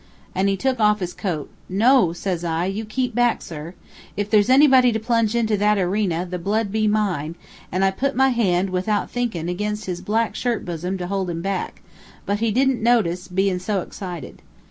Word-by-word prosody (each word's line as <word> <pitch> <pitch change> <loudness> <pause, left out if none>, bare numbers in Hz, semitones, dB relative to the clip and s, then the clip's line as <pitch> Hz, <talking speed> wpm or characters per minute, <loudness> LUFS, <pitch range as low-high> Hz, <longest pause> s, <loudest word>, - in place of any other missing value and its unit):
An' 190 +1 +1
he 195 0 +1
took 260 +4 0
off 210 -1 +3
his 180 -2 -4
coat. 165 -7 -3 0.2
'No,' 220 0 +4
says 175 0 -3
I, 165 0 -1
'you 200 +4 -3
keep 250 +3 -2
back, 240 +1 +2
sir. 160 +2 -8 0.4
If 205 0 -2
there's 210 0 +4
anybody 260 -2 +6
to 220 - -1
plunge 230 -1 +1
into 220 -2 +2
that 210 +1 +3
erena, 185 -2 0
the 180 0 -4
blood 205 +3 -1
be 215 0 +1
mine;' 185 -7 0 0.4
an' 185 +2 0
I 195 - +4
put 275 +8 -2
my 265 +1 +4
hand, 195 -6 +1
without 195 +3 -1
thinkin', 225 -10 -2
ag'in 210 +4 -2
his 185 -4 -5
black 225 +2 0
shirt 240 -3 -2
bosom, 180 +2 -3
to 180 - -4
hold 190 0 -2
him 165 0 -4
back; 195 -1 -3 0.4
but 205 +1 -1
he 230 0 +1
didn't 260 +2 +2
notice, 195 -7 +2
bein' 190 0 0
so 195 +1 -1
excited. 175 -6 -8
200 Hz, 195 wpm, -22 LUFS, 180-225 Hz, 0.4 s, anybody